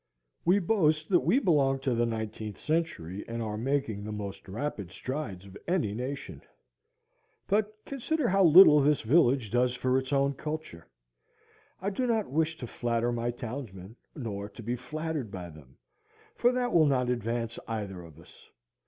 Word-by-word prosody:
We 180 +4 +5
boast 160 -6 +2
that 180 -3 +5
we 250 - +2
belong 145 - +3
to 130 -2 0
the 120 0 +1
nineteenth 110 -2 -4
century 130 - -2
and 115 0 -4
are 110 -2 -3
making 115 -3 -1
the 110 - -5
most 100 -2 -6
rapid 100 -3 -4
strides 130 -9 -5
of 95 -1 -13
any 170 - +1
nation. 130 +5 -5 1.0
But 210 +1 0
consider 275 +1 -1
how 195 +1 +4
little 165 -2 +9
this 145 -1 +3
village 130 -3 +3
does 125 +1 +2
for 130 +1 +1
its 130 +1 -7
own 140 0 +2
culture. 150 - -6 0.9
I 195 +2 -2
do 250 +6 -1
not 225 - 0
wish 160 +2 0
to 125 - -6
flatter 120 0 -1
my 120 0 -1
townsmen, 115 -5 -7 0.2
nor 105 -7 -5
to 115 - -11
be 120 +3 -1
flattered 150 +1 -4
by 90 -3 -7
them, 70 -4 -16 0.6
for 245 - +3
that 250 -1 -1
will 160 -3 +6
not 125 -3 +2
advance 115 0 -2
either 100 -5 -4
of 80 -2 -14
us. 85 - -18
125 Hz, 165 wpm, -29 LUFS, 110-160 Hz, 1.0 s, little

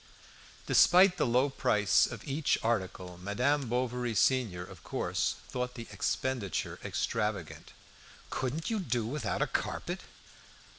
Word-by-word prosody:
Despite 180 +1 +6
the - - +2
low 125 +4 +3
price 105 -5 +3
of 115 -3 -8
each 145 +2 +1
article, 95 -5 -2
Madame 125 +8 0
Bovary 125 -1 -1
senior, 105 -9 +2
of 95 -2 -13
course, - - -1
thought 125 0 -3
the 115 - -7
expenditure 125 -8 -2
extravagant. - - -2 0.6
"Couldn't 140 - -2
you 220 - 0
do 125 - -1
without 125 0 -1
a - - +2
carpet? - - -3
125 Hz, 120 wpm, -31 LUFS, 105-135 Hz, 0.6 s, Despite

